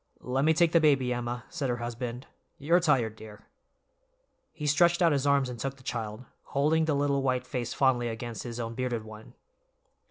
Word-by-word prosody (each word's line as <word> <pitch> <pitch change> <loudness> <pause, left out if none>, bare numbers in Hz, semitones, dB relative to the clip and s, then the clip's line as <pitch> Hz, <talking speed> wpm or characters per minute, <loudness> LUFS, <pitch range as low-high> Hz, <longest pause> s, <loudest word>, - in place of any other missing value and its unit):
"Let 130 +3 0
me 160 0 +4
take 170 0 +4
the 170 - +5
baby, 135 -5 +3
Emma," 120 0 -4
said 145 -6 -3
her 120 - 0
husband, 120 +1 -5 0.3
"you're 165 +5 +3
tired, 130 -10 +1
dear." 105 -1 -12 1.1
He 150 -2 -7
stretched 170 +4 +4
out 170 -3 +4
his 140 -1 +1
arms 140 -2 +3
and 125 -2 -7
took 135 +3 -4
the 130 - -18
child, 115 -1 -5 0.3
holding 160 +3 +3
the 155 -2 +1
little 140 -1 +1
white 130 -1 0
face 125 -2 -4
fondly 130 -3 +2
against 115 0 -5
his 120 -1 -6
own 115 -1 -4
bearded 120 -2 -2
one. 110 0 -12
130 Hz, 190 wpm, -28 LUFS, 120-145 Hz, 1.1 s, the